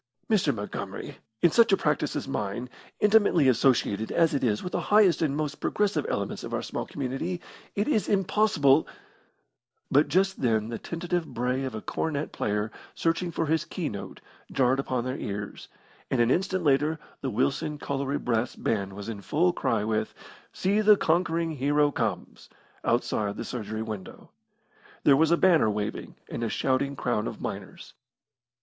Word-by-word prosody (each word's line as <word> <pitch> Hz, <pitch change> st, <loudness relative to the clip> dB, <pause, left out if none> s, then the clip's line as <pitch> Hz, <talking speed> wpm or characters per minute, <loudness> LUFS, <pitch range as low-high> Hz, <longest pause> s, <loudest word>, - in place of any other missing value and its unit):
"Mr. 205 Hz, -3 st, +3 dB
Montgomery, 105 Hz, -2 st, -6 dB, 0.3 s
in 170 Hz, -, +6 dB
such 230 Hz, +2 st, +5 dB
a 195 Hz, -, +5 dB
practice 150 Hz, -, 0 dB
as 145 Hz, -, -3 dB
mine, 120 Hz, 0 st, -3 dB, 0.3 s
intimately 205 Hz, -8 st, +4 dB
associated 115 Hz, -4 st, +2 dB
as 165 Hz, -2 st, +3 dB
it 140 Hz, -, 0 dB
is 105 Hz, -4 st, +1 dB
with 180 Hz, -, -4 dB
the -, -, -1 dB
highest 205 Hz, -4 st, +4 dB
and 145 Hz, -3 st, +1 dB
most 150 Hz, -1 st, -3 dB
progressive 205 Hz, 0 st, 0 dB
elements -, -, -3 dB
of -, -, -3 dB
our -, -, -2 dB
small -, -, -4 dB
community, 140 Hz, +6 st, -3 dB, 0.4 s
it 205 Hz, -, 0 dB
is 220 Hz, -9 st, +1 dB
impossible 190 Hz, -8 st, +3 dB, 0.5 s
" 120 Hz, +1 st, -49 dB
But 145 Hz, +3 st, +5 dB
just 190 Hz, +1 st, +1 dB
then 110 Hz, -3 st, +1 dB
the 115 Hz, -, -4 dB
tentative 175 Hz, 0 st, -3 dB
bray 125 Hz, +3 st, -1 dB
of 130 Hz, -4 st, -4 dB
a 110 Hz, -, -6 dB
cornet 150 Hz, -2 st, -2 dB
player 105 Hz, +1 st, -1 dB, 0.2 s
searching 165 Hz, +2 st, 0 dB
for 165 Hz, 0 st, -1 dB
his 160 Hz, +1 st, +1 dB
key 170 Hz, -2 st, -4 dB
note 100 Hz, -, -8 dB, 0.3 s
jarred 130 Hz, 0 st, +2 dB
upon 130 Hz, -3 st, -1 dB
their 130 Hz, +2 st, -3 dB
ears, 105 Hz, 0 st, -5 dB, 0.4 s
and 130 Hz, -, 0 dB
an 120 Hz, +1 st, +4 dB
instant 185 Hz, +1 st, 0 dB
later 150 Hz, +2 st, +2 dB, 0.2 s
the 135 Hz, -, -2 dB
Wilson 140 Hz, +6 st, 0 dB
Colliery 140 Hz, 0 st, -2 dB
brass 120 Hz, 0 st, -1 dB
band 100 Hz, -3 st, -1 dB
was 100 Hz, +2 st, -7 dB
in 110 Hz, -3 st, -5 dB
full 175 Hz, -, +2 dB
cry 110 Hz, -9 st, 0 dB
with, 110 Hz, 0 st, -1 dB, 0.4 s
"See 200 Hz, +3 st, +1 dB
the 210 Hz, -1 st, +6 dB
Conquering 165 Hz, -1 st, +1 dB
Hero 145 Hz, +1 st, +2 dB
Comes," -, -, -3 dB, 0.3 s
outside 100 Hz, -1 st, 0 dB
the -, -, -4 dB
surgery 110 Hz, -2 st, -4 dB
window. 105 Hz, -5 st, -8 dB, 0.7 s
There 140 Hz, -, +6 dB
was 155 Hz, +3 st, +4 dB
a 170 Hz, -, +4 dB
banner 165 Hz, -12 st, +4 dB
waving, 105 Hz, 0 st, -4 dB
and -, -, -5 dB
a 115 Hz, -, 0 dB
shouting 135 Hz, +3 st, 0 dB
crowd 120 Hz, -5 st, -1 dB
of -, -, -6 dB
miners. -, -, -7 dB
140 Hz, 170 wpm, -27 LUFS, 115-170 Hz, 0.7 s, in